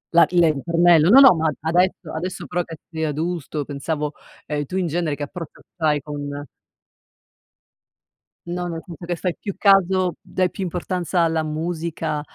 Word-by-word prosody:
La 170 - +7
le 175 -2 +4
il - - +2
ritornello 170 +2 +4
no, 260 - +9
no, 270 - +9
ma, 160 -2 0
adesso 175 +1 +1
adesso, 175 +2 -4
però, 175 +6 -1
che 165 -1 -10
sei 160 -1 -3
adulto, 155 -1 -3
pensavo, 150 +1 -3 0.3
ehm, 145 -1 -2
tu, 180 - -7
in 185 - 0
genere, 165 -2 -1
che 145 - -5
approccio 165 +2 -8 0.2
hai 150 -3 +1
con 145 -1 -6 2.0
No, 175 0 -3
nel 165 -1 -5
senso 170 -2 -10
che 175 0 -2
fai 180 +1 -2
più 200 - -5
caso 190 -3 +3
dai 185 -1 -1
più 195 - -5
importanza 180 0 -1
alla 160 -1 +1
musica, 155 -1 -3
165 Hz, 165 wpm, -22 LUFS, 155-180 Hz, 2.0 s, no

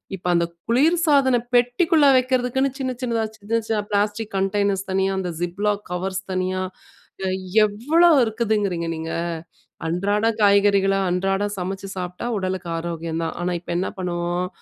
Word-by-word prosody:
இப்ப 180 -1 -7
அந்த 170 0 +3 0.2
குளிர்சாதன 280 -1 +3 0.2
பெட்டிக்குள்ள 285 +6 +3
வைக்கிறதுக்குன்னு 255 +1 +1
சின்ன 260 -2 -2
சின்னதா, 230 -3 0
சின்ன 225 +3 -1
சின்ன 215 -2 0
பிளாஸ்டிக் 205 +2 0
கண்டெய்னர்ஸ் 195 0 0
தனியா, 190 +1 +1
அந்த 185 -2 -3
ஜிப்லாக் 205 +4 -1
கவர்ஸ் 190 +2 -2
தனியா, 185 0 -1 1.0
எவ்வளோ 295 +12 +3
இருக்குதுங்கிறீங்க 210 -6 -1
நீங்க! 160 0 -5 0.8
அன்றாட 200 +6 0 0.2
காய்கறிகள, 200 -1 +4
அன்றாடம் 195 +3 0
சமைச்சு 195 +2 -4
சாப்பிட்டா, 180 +5 -4
உடலுக்கு 185 -2 -3
ஆரோக்கியம் 165 -1 -4
தான். 165 - -3
ஆனா 180 0 -1
இப்ப 175 - -7
என்ன 185 - -1
பண்ணுவோம்? 175 0 -2
200 Hz, 125 wpm, -22 LUFS, 180-230 Hz, 1.0 s, காய்கறிகள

